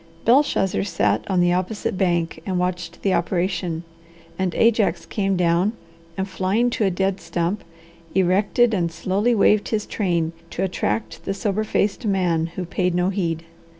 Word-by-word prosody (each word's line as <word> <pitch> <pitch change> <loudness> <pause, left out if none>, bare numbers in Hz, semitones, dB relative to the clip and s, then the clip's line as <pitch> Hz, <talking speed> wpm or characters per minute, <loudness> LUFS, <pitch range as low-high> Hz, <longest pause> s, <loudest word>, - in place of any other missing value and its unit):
Belshazzar 230 -7 +3
sat 180 -4 +1
on 185 -2 +2
the 175 0 +3
opposite 190 +3 -2
bank 170 -4 0
and 185 0 -2
watched 180 -1 -3
the 195 - +2
operation; 175 -1 -1 0.5
and 185 -1 -1
Ajax 225 -2 +2
came 195 -2 -1
down 175 +4 +2 0.4
and, 190 0 -1
flying 195 +6 +1
to 220 - 0
a - - +3
dead 190 +1 0
stump, 170 +4 -2 0.5
erected 200 +5 +3
and 170 -4 0
slowly 195 +8 +1
waved 210 0 +3
his 215 -2 -1
train 170 -5 -1 0.2
to 185 - -3
attract 110 - -2
the 195 - -2
sober 205 0 -1
faced 205 -1 0
man 180 -6 +1
who 185 - -2
paid 180 +1 0
no 180 +1 +2
heed. 170 -4 -2
185 Hz, 155 wpm, -22 LUFS, 175-200 Hz, 0.5 s, Belshazzar